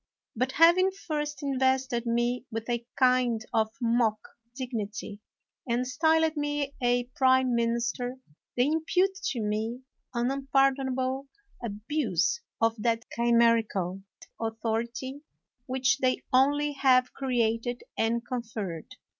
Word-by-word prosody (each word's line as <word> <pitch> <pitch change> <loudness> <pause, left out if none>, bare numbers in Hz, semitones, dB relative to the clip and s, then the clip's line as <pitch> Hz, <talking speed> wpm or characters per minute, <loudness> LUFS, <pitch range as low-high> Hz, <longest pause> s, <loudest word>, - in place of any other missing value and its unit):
But 255 +3 -1
having 345 +3 +6
first 300 -6 -4
invested 260 -3 +1
me 240 +2 0
with 225 0 -4
a 235 -1 -1
kind 250 -3 +3
of 220 -1 +2
mock 230 -3 +2 0.4
dignity, 220 -5 -5 0.5
and 245 +2 0
styled 320 +4 +2
me 290 -1 -2
a 245 0 +2
prime 260 -1 +4
minister, 235 +2 -1 0.4
they 245 - +4
impute 325 +5 +1
to 240 - -1
me 220 +4 -2 0.3
an 240 +2 +1
unpardon 270 -1 +1
able 260 +1 -2 0.4
abuse 230 - -1 0.2
of 225 -1 +1
that 230 +1 0
chimerical 230 -6 +2 0.4
authority 230 +4 -3 0.5
which 265 +1 +1
they 255 -1 +1
only 290 +3 +3
have 255 -3 +3
created 240 -2 -1
and 230 +1 0
conferred. 220 -9 -5
250 Hz, 115 wpm, -28 LUFS, 230-270 Hz, 0.5 s, having